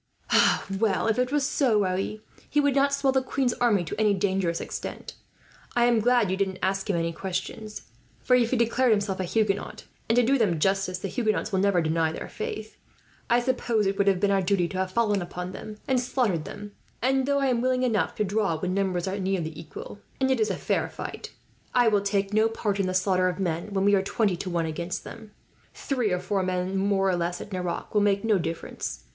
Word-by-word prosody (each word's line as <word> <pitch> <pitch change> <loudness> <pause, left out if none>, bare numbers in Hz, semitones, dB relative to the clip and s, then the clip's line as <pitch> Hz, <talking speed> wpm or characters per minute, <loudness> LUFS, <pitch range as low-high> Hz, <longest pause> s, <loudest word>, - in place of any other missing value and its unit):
"Well, 220 -1 +1
if 225 +1 +1
it 250 +1 +1
was 290 -2 +1
so, 240 -7 +2
Raoul, 190 +3 -2 0.3
he 295 - +2
will 285 -1 +3
not 280 +1 +3
swell 275 -1 +1
the 265 - +3
queen's 260 -1 0
army 220 -7 +2
to 160 - -5
any 210 -2 +3
dangerous 190 -3 0
extent. - - -6 0.6
I 240 0 +4
am 240 -2 +4
glad 245 +1 +3
that 185 - -2
you 190 - 0
didn't 190 -1 -1
ask 190 +2 0
him 195 - +2
any 165 0 -1
questions; 200 +4 -5 0.4
for 250 - +3
if 240 -2 +3
he 255 - +1
declared 235 +2 +2
himself 205 -3 +1
a 185 - -1
Huguenot 210 +1 -1 0.3
and 225 - +3
to 245 - +5
do 270 +3 +3
them 180 -8 +2
justice, 190 +1 +1
the 190 - -4
Huguenots 215 +3 -1
will 190 - +1
never 190 -3 +3
deny 160 0 +1
their - - -6
faith 215 0 -6 0.5
I 240 0 +5
suppose 240 -4 0
it 195 +1 -1
would 200 - +3
have 195 -2 +3
been 200 +1 +2
our 195 -1 +3
duty 185 -1 +1
to 190 - -5
have 190 0 0
fallen 210 -2 +1
upon 180 +1 -5
them 210 +2 -8
and 260 -1 +2
slaughtered 240 - 0
them; 205 0 -8 0.3
and 265 +1 +1
though 280 0 +2
I 275 - +1
am 240 -2 +1
willing 255 0 +1
enough 230 -4 +1
to - - 0
draw, 200 -4 0
when 185 +2 -2
numbers 190 -2 0
are 195 +2 -2
nearly 185 -4 -1
equal 160 +5 -9 0.2
and 265 0 +2
it 260 - +1
is 220 - +2
a - - -1
fair - - -1
fight, - - -7 0.4
I 245 -2 +5
will 205 -2 +2
take 200 0 -1
no 220 +1 +4
part 210 -3 -2
in 195 - +1
the 185 - -2
slaughter 185 -1 +2
of 180 - -4
men 175 +1 -2
when 195 0 0
we 205 - +4
are 195 - +4
twenty 195 0 0
to 185 - -4
one 170 -2 0
against 170 +3 -4
them. 220 -2 -10 0.5
Three 250 -7 -1
or 180 - +1
four 190 +2 -1
men, 185 0 -1
more 195 0 +1
or 185 - +2
less, 175 0 -2
at 210 - -9
Nerac 180 -2 -4
will 210 - +3
make 200 0 +2
no 215 -3 +3
difference. 165 - -5
200 Hz, 230 wpm, -26 LUFS, 185-230 Hz, 0.6 s, to